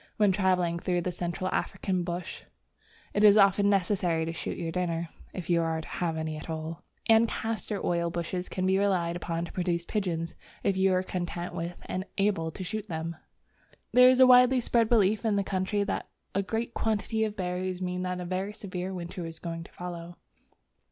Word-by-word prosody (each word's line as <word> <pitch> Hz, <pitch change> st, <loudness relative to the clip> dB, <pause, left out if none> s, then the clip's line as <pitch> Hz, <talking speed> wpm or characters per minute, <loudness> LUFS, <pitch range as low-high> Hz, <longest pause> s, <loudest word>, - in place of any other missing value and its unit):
When 210 Hz, -2 st, +5 dB
travelling 180 Hz, -3 st, +2 dB
through 175 Hz, 0 st, 0 dB
the 180 Hz, -, -2 dB
Central 175 Hz, +1 st, -3 dB
African 185 Hz, -2 st, -1 dB
bush, 175 Hz, 0 st, -4 dB, 0.7 s
it 205 Hz, -, +2 dB
is 210 Hz, 0 st, +8 dB
often 200 Hz, 0 st, +5 dB
necessary 180 Hz, -4 st, +1 dB
to 165 Hz, -, -3 dB
shoot -, -, -4 dB
your 165 Hz, -1 st, -3 dB
dinner 170 Hz, -2 st, -1 dB, 0.2 s
(if 180 Hz, -3 st, -6 dB
you 170 Hz, -1 st, +3 dB
are 165 Hz, -1 st, 0 dB
to 160 Hz, -, -8 dB
have 165 Hz, -2 st, -2 dB
any 160 Hz, -1 st, -3 dB
at 155 Hz, -, -9 dB
all), 160 Hz, +1 st, -4 dB, 0.3 s
and 225 Hz, +1 st, +6 dB
castor 220 Hz, -2 st, -3 dB
oil 170 Hz, -1 st, +1 dB
bushes 175 Hz, +2 st, -3 dB
can 185 Hz, -, -2 dB
be 190 Hz, +1 st, +3 dB
relied 180 Hz, -4 st, +1 dB
upon 170 Hz, -1 st, -2 dB
to -, -, -10 dB
produce 175 Hz, -2 st, -1 dB
pigeons, 170 Hz, -6 st, -2 dB, 0.3 s
if 195 Hz, -, +2 dB
you 190 Hz, 0 st, +3 dB
are 185 Hz, -, +1 dB
content 175 Hz, -1 st, -4 dB
with 170 Hz, +1 st, -4 dB
and 185 Hz, -, -3 dB
are -, -, -24 dB
able 195 Hz, -5 st, +1 dB
to 185 Hz, -, -7 dB
shoot 215 Hz, +3 st, -4 dB
them. 165 Hz, 0 st, -3 dB, 0.8 s
There 250 Hz, +1 st, +8 dB
is 255 Hz, 0 st, +4 dB
a 260 Hz, -, +10 dB
widely 250 Hz, 0 st, +7 dB
spread 230 Hz, -2 st, +2 dB
belief 215 Hz, -2 st, +3 dB
in 220 Hz, -3 st, +2 dB
the 200 Hz, -, +2 dB
country 195 Hz, +2 st, 0 dB
that 200 Hz, -, -3 dB, 0.2 s
a 195 Hz, -, +2 dB
great 225 Hz, +4 st, -3 dB
quantity 220 Hz, 0 st, 0 dB
of 215 Hz, -1 st, -2 dB
berries 180 Hz, 0 st, -2 dB
means 180 Hz, 0 st, -2 dB
that 180 Hz, 0 st, -2 dB
a 180 Hz, -, -4 dB
very 190 Hz, +3 st, -2 dB
severe 185 Hz, -2 st, -5 dB
winter 175 Hz, 0 st, -5 dB
is 165 Hz, 0 st, -9 dB
going 165 Hz, -1 st, -5 dB
to -, -, -15 dB
follow. 175 Hz, -1 st, -7 dB
180 Hz, 200 wpm, -29 LUFS, 170-200 Hz, 0.8 s, a